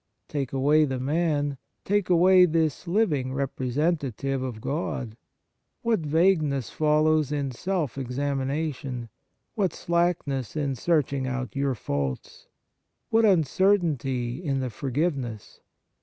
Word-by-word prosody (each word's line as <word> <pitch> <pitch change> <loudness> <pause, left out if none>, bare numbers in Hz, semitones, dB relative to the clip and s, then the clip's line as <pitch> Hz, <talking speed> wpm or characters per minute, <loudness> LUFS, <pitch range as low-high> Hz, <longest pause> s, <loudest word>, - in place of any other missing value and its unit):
Take 140 -4 -3
away 145 +3 +3
the 130 -2 -3
man, 145 -1 0 0.3
take 205 -1 +1
away 180 +1 +6
this 160 0 0
living 155 -10 +1
representative 135 0 -1
of 125 -4 -4
God, 130 -4 -3 0.7
what 230 -3 +2
vagueness 155 - +1
follows 155 -1 +2
in 140 -2 -1
self 155 -1 -2
examination, 135 -1 -3 0.4
what 195 -7 0
slackness 170 -8 -1
in 145 -3 -1
search 150 +1 +1
ing 135 -2 -2
out 130 0 -4
your 140 -1 0
faults! 70 - -4 0.6
What 225 0 +4
uncertainty 160 - +1
in 140 -4 0
the 130 -2 -3
forgiveness 135 - -3
145 Hz, 110 wpm, -26 LUFS, 130-165 Hz, 0.7 s, away